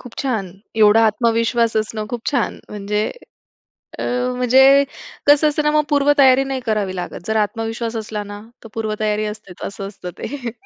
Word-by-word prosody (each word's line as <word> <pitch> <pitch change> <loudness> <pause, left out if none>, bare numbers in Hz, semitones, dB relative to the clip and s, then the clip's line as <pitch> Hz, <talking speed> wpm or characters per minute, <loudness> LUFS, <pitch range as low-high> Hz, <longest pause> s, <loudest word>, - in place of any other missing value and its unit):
खूप 245 - -12
छान. 225 -8 -1 0.3
एवढा 220 +1 +6
आत्मविश्वास 230 +1 +1
असणं 215 0 -2
खूप 240 -2 -5
छान 245 -6 -1
म्हणजे 210 +1 -2 0.9
अ, - - -2 0.3
म्हणजे 265 +3 +6 0.4
कसं 290 +1 +6
असतं 300 0 -1
ना 300 - +2
मग 300 0 +3
पूर्वतयारी 280 -2 +5
नाही 270 -1 -3
करावी 210 -4 -1
लागत. 180 -1 -5
जर 220 - -1
आत्मविश्वास 225 +2 -4
असला 215 -1 -4
ना 205 0 -9 0.2
तर - - -9
पूर्वतयारी 215 -1 -1
असतेच 210 -4 -8
असं 195 0 -6
असतं 195 -3 -8
ते. 260 -4 -5
225 Hz, 160 wpm, -19 LUFS, 210-260 Hz, 0.9 s, एवढा